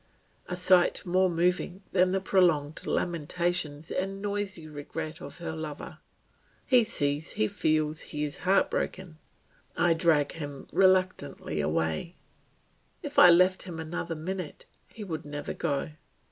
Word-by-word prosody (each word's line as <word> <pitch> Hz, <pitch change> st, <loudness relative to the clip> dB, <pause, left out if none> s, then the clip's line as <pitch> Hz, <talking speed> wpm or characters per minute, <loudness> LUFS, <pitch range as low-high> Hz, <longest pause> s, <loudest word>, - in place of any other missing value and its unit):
A 180 Hz, -, -3 dB
sight 180 Hz, +1 st, +4 dB
more 185 Hz, +1 st, +3 dB
moving 180 Hz, +2 st, 0 dB
than 185 Hz, -1 st, +3 dB
the 190 Hz, -, +1 dB
prolonged 170 Hz, -6 st, +1 dB
lamentations 165 Hz, -2 st, -1 dB
and 195 Hz, +1 st, -2 dB
noisy 200 Hz, -5 st, -3 dB
regrets 155 Hz, +2 st, -6 dB
of -, -, -8 dB
her 170 Hz, -, -5 dB
lover! 155 Hz, -2 st, -7 dB, 0.7 s
He 250 Hz, -2 st, +5 dB
sees, 145 Hz, -6 st, 0 dB
he 110 Hz, -, +1 dB
feels, 155 Hz, +4 st, 0 dB
he 150 Hz, -, -4 dB
is 145 Hz, -1 st, -3 dB
heartbroken. 185 Hz, -2 st, 0 dB, 0.6 s
I 175 Hz, -1 st, +4 dB
drag 160 Hz, -3 st, +2 dB
him 145 Hz, -4 st, -7 dB
reluctantly 185 Hz, -, +1 dB
away; 80 Hz, -, -1 dB, 0.9 s
if 290 Hz, -1 st, 0 dB
I 180 Hz, -, +10 dB
left 185 Hz, +2 st, +5 dB
him 175 Hz, -3 st, -7 dB
another 165 Hz, +1 st, -4 dB
minute, 180 Hz, +1 st, -6 dB, 0.2 s
he 220 Hz, -, -10 dB
would 160 Hz, -6 st, -5 dB
never 145 Hz, 0 st, -5 dB
go. 145 Hz, -2 st, -2 dB
170 Hz, 130 wpm, -28 LUFS, 150-185 Hz, 0.9 s, I